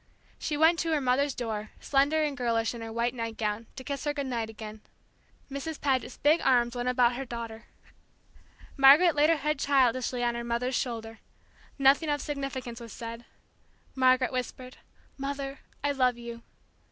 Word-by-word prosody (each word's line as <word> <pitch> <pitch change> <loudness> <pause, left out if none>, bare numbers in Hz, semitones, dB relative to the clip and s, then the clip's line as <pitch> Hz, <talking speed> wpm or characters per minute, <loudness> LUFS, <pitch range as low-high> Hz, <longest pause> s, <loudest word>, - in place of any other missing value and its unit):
She 300 - -2
went 325 +2 +5
to 330 - -1
her 305 - +2
mother's 270 +2 +1
door, 220 -3 -4
slender 290 +3 +2
and 295 -2 -1
girlish 230 -2 0
in 235 - -8
her 225 0 -6
white 235 +2 0
nightgown, 225 -2 -3
to 260 - -8
kiss 280 0 -4
her 295 0 -1
good 280 -1 -2
night 235 -4 -2
again. 215 -1 -9 0.7
Mrs. 280 +3 -5
Paget's 265 -3 0
big 305 +4 +3
arms 240 -2 +3
went 245 +1 -1
about 250 -1 +3
her 270 - -3
daughter. 230 -2 -7 1.1
Margaret 290 +6 +7
laid 295 +1 +4
her 330 - +5
head 300 0 -1
childishly 255 -3 +2
on 240 0 +1
her 235 0 -4
mother's 235 +2 -1
shoulder. 225 -3 -3 0.6
Nothing 280 +3 +4
of 290 0 +1
significance 275 -5 -5
was 230 -2 -10
said. 230 0 -7 0.7
Margaret 255 -1 +3
whispered, 255 0 -5 0.4
"Mother, 275 0 -4 0.2
I 285 - +2
love 255 -3 +2
you!" 235 -1 -8
255 Hz, 165 wpm, -28 LUFS, 235-280 Hz, 1.1 s, Margaret